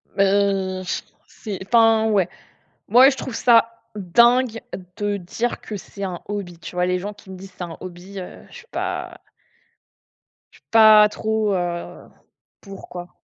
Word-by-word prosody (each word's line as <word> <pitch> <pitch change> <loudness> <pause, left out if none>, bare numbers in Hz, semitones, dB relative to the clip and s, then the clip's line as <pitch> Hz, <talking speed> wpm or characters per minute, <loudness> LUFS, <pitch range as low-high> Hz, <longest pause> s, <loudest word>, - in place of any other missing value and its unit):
Beh, 195 -1 +1
je 180 - -3 0.3
c'est 205 -3 -7
enfin, 225 -1 +4
ouais. 195 -5 +2 0.6
Moi, 250 +6 +7
je 270 - -3
trouve 255 - -6
ça 230 -1 +3
dingue 235 +5 +3 0.4
de 205 -1 -1
dire 225 +6 -4
que 210 - -6
c'est 200 +1 -9
un 180 -3 -4
hobby. 195 -4 -5
Tu 175 - -10
vois, 180 0 +1
les 180 0 0
gens 205 +3 -6
qui 205 -1 -18
me 185 - -9
disent: 190 0 -12
«C'est - - -5
un 170 -2 -7
hobby», 185 +2 -9
heu, 180 - -10
je - - -12
suis 475 -1 -15
pas - - -4 1.3
je - - -19
suis - - -55
pas 215 -1 +8
trop, 220 -1 -1
heu, 175 -1 -4 0.5
pour 195 -1 -11
quoi. 175 0 -9
200 Hz, 165 wpm, -21 LUFS, 185-225 Hz, 1.3 s, pas